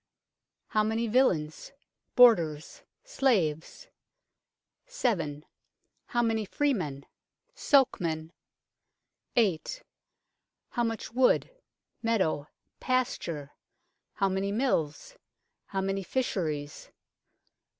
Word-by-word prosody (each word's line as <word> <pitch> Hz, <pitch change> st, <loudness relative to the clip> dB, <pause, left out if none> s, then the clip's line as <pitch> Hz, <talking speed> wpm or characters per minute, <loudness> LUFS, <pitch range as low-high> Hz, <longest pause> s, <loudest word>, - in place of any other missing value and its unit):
How 215 Hz, -, +2 dB
many 220 Hz, +2 st, 0 dB
villeins 210 Hz, -, +1 dB, 0.4 s
bordars 170 Hz, -, +4 dB, 0.2 s
slaves? 205 Hz, -, 0 dB, 1.0 s
7. 170 Hz, -, -1 dB, 0.6 s
How 240 Hz, 0 st, +1 dB
many 225 Hz, -1 st, +1 dB
freemen 185 Hz, -, -1 dB, 0.5 s
sokemen? 165 Hz, -, +2 dB, 1.0 s
8. 220 Hz, -, +1 dB, 0.9 s
How 240 Hz, -, -1 dB
much 225 Hz, -1 st, -3 dB
wood 255 Hz, -, +3 dB, 0.5 s
meadow 190 Hz, -11 st, 0 dB, 0.3 s
pasture? 170 Hz, -, -1 dB, 0.6 s
How 195 Hz, -, +1 dB
many 195 Hz, +1 st, -1 dB
mills? 230 Hz, -, -1 dB, 0.5 s
How 195 Hz, -1 st, -2 dB
many 195 Hz, 0 st, -1 dB
fisheries 160 Hz, -, -3 dB
200 Hz, 75 wpm, -29 LUFS, 160-245 Hz, 1.0 s, bordars